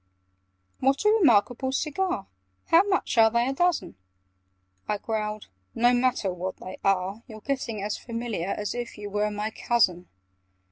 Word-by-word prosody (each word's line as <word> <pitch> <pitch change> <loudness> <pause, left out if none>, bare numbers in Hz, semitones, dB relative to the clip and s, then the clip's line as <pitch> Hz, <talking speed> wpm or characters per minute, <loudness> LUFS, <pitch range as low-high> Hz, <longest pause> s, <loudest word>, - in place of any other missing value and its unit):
"What 275 +8 +1
a - - +7
re 445 - +4
markable 245 - +3
cigar! 305 - -1 0.4
How 330 - +7
much 385 - 0
are 225 0 +7
they 235 +2 +1
a 270 - 0
dozen?" 350 - 0 0.9
I 210 - 0
growled 215 0 -3 0.3
"No 240 +1 +4
matter 245 -6 +1
what 185 +1 -5
they 185 - -9
are! 195 +2 0
You're 220 -3 -10
getting 235 -6 -3
as 210 +1 -3
familiar 230 -7 -4
As 205 +1 -2
if 240 -2 -5
you 205 -1 -7
were 210 +1 +1
my 210 +1 -3
cousin! 185 -8 +1
225 Hz, 155 wpm, -26 LUFS, 205-260 Hz, 0.9 s, a